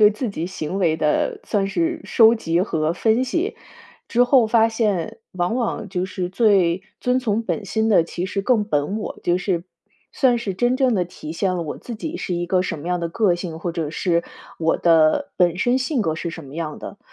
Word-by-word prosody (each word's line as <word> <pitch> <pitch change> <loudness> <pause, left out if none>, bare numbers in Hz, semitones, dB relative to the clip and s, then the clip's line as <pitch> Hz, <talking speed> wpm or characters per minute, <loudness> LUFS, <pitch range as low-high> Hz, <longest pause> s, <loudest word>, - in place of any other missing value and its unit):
对 210 0 +8
自 220 +3 -3
己 170 -4 -4
行 185 0 -4
为 165 -4 +2
的 150 -1 0
算 200 -3 0
是 330 - -1
收 225 -1 +5
集 170 -6 0
和 160 -4 0
分 225 +7 +2
析， 340 - -2 0.5
之 240 +1 +3
后 245 -3 +4
发 225 0 +4
现 210 -7 -1
往 180 +4 -1
往 230 -4 -2
就 180 -1 -2
是 185 -1 -4
最 190 -3 +3 0.2
遵 250 +1 +2
从 230 -2 0
本 220 -2 -3
心 220 +2 0
的 175 -6 +5
其 175 +2 -4
实 195 0 -2
更 225 -2 +2
本 190 +3 -1
我， - - -6
就 175 +1 +2
是 180 -2 -1 0.5
算 245 -3 +3
是 200 -5 -3
真 245 +5 +1
正 260 -4 +2
地 180 -2 +1
体 160 -2 -9
现 185 +1 0
了 175 - -2
我 155 - -6
自 240 - -7
己 320 +10 -5
是 180 - -3
一 175 0 -2
个 185 0 +2
什 165 - -4
么 155 - -9
样 180 0 0
的 170 - -2
个 190 0 +2
性， 170 -2 -6
或 170 0 -3
者 160 -3 -3
是 170 0 0 0.4
我 165 0 +2
的 165 - +3
本 175 -1 +3
身 245 +5 +2
性 255 -2 0
格 160 -4 0
是 170 +1 -4
什 165 -2 -9
么 135 +2 -11
样 160 -2 -4
的。 - - -9
190 Hz, 240 characters per minute, -22 LUFS, 170-230 Hz, 0.5 s, 对